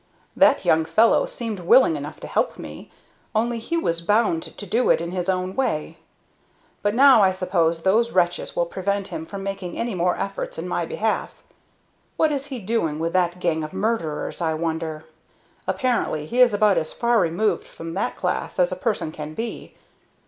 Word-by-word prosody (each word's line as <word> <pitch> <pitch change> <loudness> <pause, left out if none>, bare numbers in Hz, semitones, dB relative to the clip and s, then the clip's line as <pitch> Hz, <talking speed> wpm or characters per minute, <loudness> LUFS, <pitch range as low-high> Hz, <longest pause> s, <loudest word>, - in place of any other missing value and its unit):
"That - - +4
young 160 0 +4
fellow 225 +8 +3
seemed 225 -4 -4
willing 180 0 +5
enough 145 +1 -7
to - - -7
help - - 0
me, - - -9 0.5
only 230 +2 +1
he 335 +9 -2
was 170 - 0
bound 205 -2 +2
to 205 - -8
do 230 +6 +1
it - - +5
in 170 +1 -4
his 180 0 -2
own 185 0 -1
way; 160 -11 -1 0.8
but 205 +1 0
now 265 -3 +7
I 190 - +5
suppose 175 -3 0
those 225 +5 +3
wretches 175 -1 0
will 175 - +1
prevent 200 +3 -2
him 160 - -6
from 200 -1 -7
making 195 -3 -5
any 235 -1 -2
more 180 0 +1
efforts - - -4
in - - -4
my - - -2
behalf. 480 - -2 0.7
What 315 -1 +3
is 280 -1 -3
he 270 -3 -5
doing 195 -8 -1
with 165 +1 -2
that 180 -1 +1
gang 165 -3 0
of 155 - -7
murderers, 190 -7 -2
I 160 -2 0
wonder? 160 -1 -3 0.6
Apparently 240 - 0
he 245 +10 +1
is 245 -2 +7
about 205 -1 +3
as 155 - -5
far 235 -1 +2
removed 175 +2 0
from 165 0 -8
that 190 - -2
class 180 -1 -2
as 180 0 +3
a - - -2
person 190 -5 -2
can 155 0 -7
be. 230 +4 -6
185 Hz, 185 wpm, -23 LUFS, 165-230 Hz, 0.8 s, now